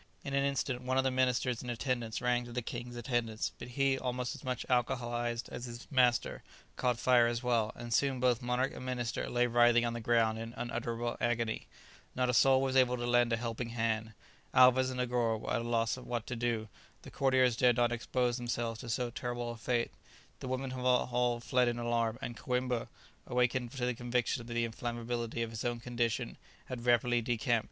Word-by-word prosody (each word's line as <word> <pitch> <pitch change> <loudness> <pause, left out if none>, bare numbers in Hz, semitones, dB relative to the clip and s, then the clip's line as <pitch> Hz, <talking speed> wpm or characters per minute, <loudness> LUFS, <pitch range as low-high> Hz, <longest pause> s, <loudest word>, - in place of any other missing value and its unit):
In 140 - -5
an 140 0 +2
instant 140 -2 -1
one 130 +1 -1
of 135 - +4
the 130 - +1
ministers 125 -1 +1
in 125 - -6
attendance 120 -2 -2
ran 125 0 +2
to 120 - -10
the 125 0 -3
king's 120 +1 -6
assistance, 120 -2 -1
but - - -7
he, 135 +1 +1
almost 125 -1 -2
as - - -11
much 125 -1 -3
alcoholized 120 -1 0
as 120 - -6
his 120 0 -8
master, 125 -3 +2 0.3
caught 125 -2 +1
fire 120 -1 +5
as 120 +1 -2
well, 115 -3 +1
and 120 0 -5
soon 135 0 +2
both 125 -1 +2
monarch 125 +2 0
and - - -8
minister 125 -2 -2
lay 120 0 +2
writhing 120 0 +4
on 120 - -1
the 120 - -4
ground 110 -1 +2
in 115 +1 -7
unutterable 120 0 -3
agony. 115 -2 -1 0.5
Not 125 0 +2
a - - -5
soul 135 +2 +5
was 135 -1 0
able 125 -1 +4
to 120 - -3
lend 120 0 +3
a 115 - +2
helping 115 0 -4
hand. 115 -1 -1 0.4
Alvez 130 0 +6
and 130 -1 -4
Negoro 120 -2 +1
were - - -4
at 115 - +1
a - - -5
loss 115 -1 +1
what 120 -2 -4
to 125 - -4
do; 115 -2 -1 0.4
the - - -10
courtiers 130 -3 +3
dared 120 0 +4
not 120 0 +3
expose 120 +1 0
themselves 120 -2 -2
to 120 - -7
so 120 +2 -1
terrible 120 0 -3
a - - -7
fate; 115 +1 -1 0.5
the - - -6
women 130 +1 -2
had 130 0 -5
all 125 -1 +2
fled 125 +1 +2
in 120 0 0
alarm, 115 -1 0
and 120 - -4
Coïmbra, 125 -1 -1 0.4
awakened 125 0 +1
to 130 -3 -2
the 125 - 0
conviction 120 +1 -1
of 115 - -11
the 120 -1 0
inflammability 120 0 -3
of 115 - -5
his 110 - -5
own 120 -1 -1
condition, 120 -1 -2 0.3
had 125 -1 -6
rapidly 120 0 +3
decamped. 120 0 +1
120 Hz, 205 wpm, -32 LUFS, 120-125 Hz, 0.5 s, Alvez